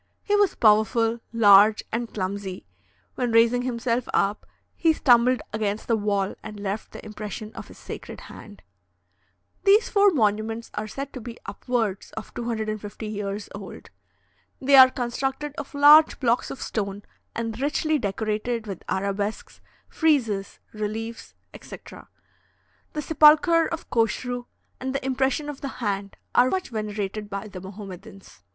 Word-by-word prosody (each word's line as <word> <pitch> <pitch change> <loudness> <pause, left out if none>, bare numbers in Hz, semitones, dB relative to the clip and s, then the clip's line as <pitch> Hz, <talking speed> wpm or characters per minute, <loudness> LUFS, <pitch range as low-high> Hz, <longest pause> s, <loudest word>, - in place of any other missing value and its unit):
He 415 - +1
was 410 -2 +3
powerful, 225 +1 +3
large, 210 -1 +6
and 230 +1 -3
clumsy; 190 -1 -4 0.5
when 245 -2 -2
raising 230 +2 +4
himself 245 -1 -2
up, 200 +1 0 0.3
he 325 -1 +3
stumbled 250 -3 +4
against 215 -1 -2
the 230 - +3
wall 205 -2 0
and 210 -1 -9
left 200 +1 -4
the - - -10
impression 215 0 -7
of - - -9
his - - -14
sacred - - -9
hand. 95 -3 -13 1.0
These 420 +3 +5
four 405 -1 +5
monuments 225 - 0
are 215 - -4
said 275 +5 -6
to 255 - -7
be 235 +1 -8
upwards 210 -1 -3
of 220 - -8
250 220 -2 -4
years 205 -1 -4
old. 200 -1 -10 0.7
They 275 +1 +4
are 260 -1 +10
constructed 270 +4 -3
of 285 0 -8
large 295 +2 +7
blocks 240 -2 +1
of - - -6
stone, 200 -1 -4 0.3
and 230 0 -4
richly 305 +1 +1
decorated 215 +2 -2
with 195 -5 -6
arabesques, 200 +2 -3 0.3
friezes, 230 - 0 0.2
reliefs, 220 +2 -5 0.2
etc. - - -11 0.9
The 300 - -3
sepulchre 320 +2 +5
of 330 0 -6
Koshru 245 +2 -1 0.3
and 260 +1 -4
the 275 - -3
impression 265 +2 0
of 295 -2 -7
the 275 - -3
hand 200 -4 -3 0.2
are 250 +1 +5
much 375 +4 -2
venerated 210 -2 -4
by 200 +1 -5
the 185 -2 -9
Mahomedans. 195 +1 -11
225 Hz, 140 wpm, -25 LUFS, 205-260 Hz, 1.0 s, are